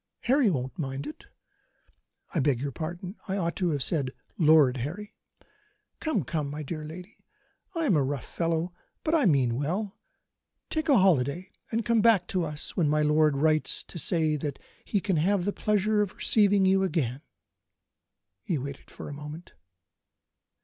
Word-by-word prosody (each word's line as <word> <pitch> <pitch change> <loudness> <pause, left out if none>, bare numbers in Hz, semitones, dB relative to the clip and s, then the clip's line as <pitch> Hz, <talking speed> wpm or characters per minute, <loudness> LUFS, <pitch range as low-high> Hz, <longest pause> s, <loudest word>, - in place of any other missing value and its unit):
Harry 260 -2 +3
won't 130 -5 -3
mind 135 -1 -3
it 150 - -9 1.1
I - - +1
beg 135 -3 +2
your 140 +2 -3
pardon, 175 - -6
I 195 0 -1
ought 170 -3 -1
to 180 -2 +1
have 145 -4 0
said 145 -7 0 0.3
Lord 150 -5 +5
Harry. 180 - -5 0.9
Come! 310 - 0
come! 150 +1 -2
my 150 +2 -5
dear 155 +2 -5
lady; 175 +6 -10 0.5
I 330 -1 0
am 200 - +3
a 145 - +3
rough 135 -1 -3
fellow, 165 +1 -1 0.3
but 315 - 0
I 310 -6 +4
mean 130 -7 +2
well. 185 +9 -2 0.7
Take 315 -1 -1
a 275 - +6
holiday, 175 -1 +2 0.2
and 225 -1 -1
come 230 -2 +3
back 205 -5 +5
to 185 -2 0
us 150 -2 -5
when 160 -5 +2
my 150 0 +2
lord 150 -1 +3
writes 155 +1 +1
to 170 - -8
say 160 -3 +1
that 145 -1 -4 0.3
he 205 - 0
can 190 -4 0
have 180 +3 +2
the 205 - 0
pleasure 210 0 +1
of 205 -3 -2
receiving 205 -3 +3
you 190 0 +4
again." 145 -9 -1 1.2
He 175 -6 -1
waited 140 +1 -7
for - - -9
a - - -6
moment. 150 +4 -9
165 Hz, 170 wpm, -28 LUFS, 145-195 Hz, 1.2 s, a